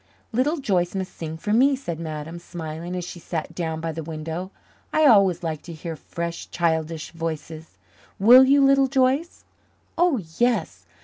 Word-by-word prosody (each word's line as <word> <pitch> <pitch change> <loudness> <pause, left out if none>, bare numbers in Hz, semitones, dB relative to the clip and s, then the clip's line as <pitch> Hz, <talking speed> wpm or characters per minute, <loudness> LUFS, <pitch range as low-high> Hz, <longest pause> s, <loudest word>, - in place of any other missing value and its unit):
"Little 265 +8 +1
Joyce 185 - 0
must 190 -1 -4
sing 160 -1 -6
for 210 +6 -2
me," 270 +5 +5
said 170 - -6
Madame, 160 +1 -6
smiling, 170 0 -6
as 180 -1 -3
she 175 - -8
sat 165 0 -5
down 160 -2 -3
by 165 0 -3
the 160 +1 -5
window. 160 +3 -5 0.4
"I 310 - +3
always 195 - +5
like 160 -3 -3
to 170 - -9
hear 165 +1 -6
fresh, 170 +2 -6
childish 160 -2 -1
voices. 160 - -6 0.4
Will 245 +6 +8
you, 275 +1 +5
Little 275 0 +5
Joyce?" 270 +5 0 0.5
"Oh, 350 -5 +4 0.2
yes." 240 0 0
175 Hz, 165 wpm, -24 LUFS, 160-250 Hz, 0.5 s, Will